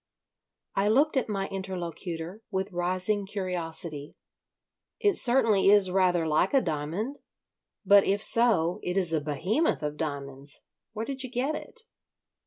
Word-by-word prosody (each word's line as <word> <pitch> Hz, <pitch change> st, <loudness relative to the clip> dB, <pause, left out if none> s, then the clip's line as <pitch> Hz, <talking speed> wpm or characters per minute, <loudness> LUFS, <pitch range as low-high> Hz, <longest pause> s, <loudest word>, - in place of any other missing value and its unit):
I 195 Hz, +1 st, +2 dB
looked 280 Hz, +9 st, +3 dB
at 260 Hz, -4 st, 0 dB
my 195 Hz, -2 st, -2 dB
interlocutor 180 Hz, -1 st, -5 dB
with 190 Hz, 0 st, -3 dB
rising 185 Hz, +3 st, -1 dB
curiosity. 170 Hz, -6 st, -3 dB, 0.8 s
"It 410 Hz, -2 st, +3 dB
certainly 230 Hz, -6 st, +4 dB
is 200 Hz, -2 st, +5 dB
rather 180 Hz, -3 st, +2 dB
like 160 Hz, -, +1 dB
a 270 Hz, -, +5 dB
diamond. 170 Hz, -, -3 dB, 0.7 s
But, 200 Hz, +1 st, +7 dB
if 200 Hz, +1 st, +1 dB
so, 205 Hz, -7 st, +3 dB
it 180 Hz, +2 st, -2 dB
is 175 Hz, -4 st, +1 dB
a 155 Hz, -, +1 dB
Behemoth 170 Hz, -, 0 dB
of 150 Hz, 0 st, -3 dB
diamonds. 140 Hz, -2 st, -5 dB, 0.3 s
Where 220 Hz, +1 st, -4 dB
did 270 Hz, 0 st, -5 dB
you 255 Hz, -, -5 dB
get 260 Hz, +5 st, -1 dB
it?" 480 Hz, +9 st, -8 dB
190 Hz, 140 wpm, -27 LUFS, 165-220 Hz, 0.8 s, But